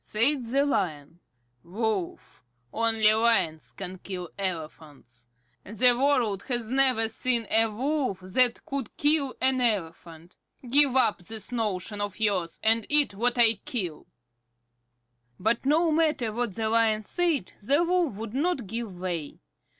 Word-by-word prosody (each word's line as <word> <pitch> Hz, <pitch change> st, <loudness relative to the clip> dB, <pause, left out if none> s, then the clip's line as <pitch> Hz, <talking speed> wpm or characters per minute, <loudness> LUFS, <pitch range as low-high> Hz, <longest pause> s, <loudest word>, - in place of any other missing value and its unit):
Said 255 Hz, +5 st, +3 dB
the 275 Hz, +5 st, +1 dB
Lion: 165 Hz, -, -2 dB, 0.4 s
"Wolf, 200 Hz, 0 st, -4 dB, 0.3 s
only 225 Hz, -1 st, +3 dB
Lions 220 Hz, -9 st, +1 dB
can 185 Hz, -1 st, -8 dB
kill 180 Hz, -3 st, -7 dB
elephants. 155 Hz, -9 st, -7 dB, 0.4 s
The 235 Hz, +5 st, +3 dB
world 245 Hz, -7 st, +1 dB
has 240 Hz, -3 st, -1 dB
never 260 Hz, -4 st, +4 dB
seen 235 Hz, +1 st, -1 dB
a 225 Hz, +1 st, +4 dB
Wolf 255 Hz, -2 st, -2 dB
that 235 Hz, +7 st, 0 dB
could 275 Hz, -5 st, -5 dB
kill 290 Hz, -2 st, +1 dB
an 260 Hz, 0 st, +1 dB
elephant. 170 Hz, -5 st, -3 dB, 0.3 s
Give 275 Hz, +1 st, +4 dB
up 245 Hz, -6 st, +2 dB
this 220 Hz, +6 st, -7 dB
notion 210 Hz, -3 st, -3 dB
of 205 Hz, 0 st, -4 dB
yours, 195 Hz, -6 st, -1 dB
and 225 Hz, 0 st, +2 dB
eat 290 Hz, -7 st, +3 dB
what 240 Hz, +5 st, 0 dB
I 230 Hz, -2 st, +6 dB
kill." 180 Hz, -11 st, -4 dB, 1.3 s
But 230 Hz, +6 st, 0 dB
no 320 Hz, +3 st, +3 dB
matter 300 Hz, -8 st, +1 dB
what 235 Hz, -4 st, -2 dB
the 220 Hz, -1 st, -1 dB
Lion 220 Hz, -1 st, +2 dB
said, 335 Hz, -, -1 dB
the 280 Hz, +10 st, +2 dB
Wolf 345 Hz, -, 0 dB
would 220 Hz, 0 st, -7 dB
not 285 Hz, -2 st, -1 dB
give 215 Hz, -3 st, -6 dB
way. 175 Hz, -5 st, -4 dB
225 Hz, 135 wpm, -26 LUFS, 190-260 Hz, 1.3 s, I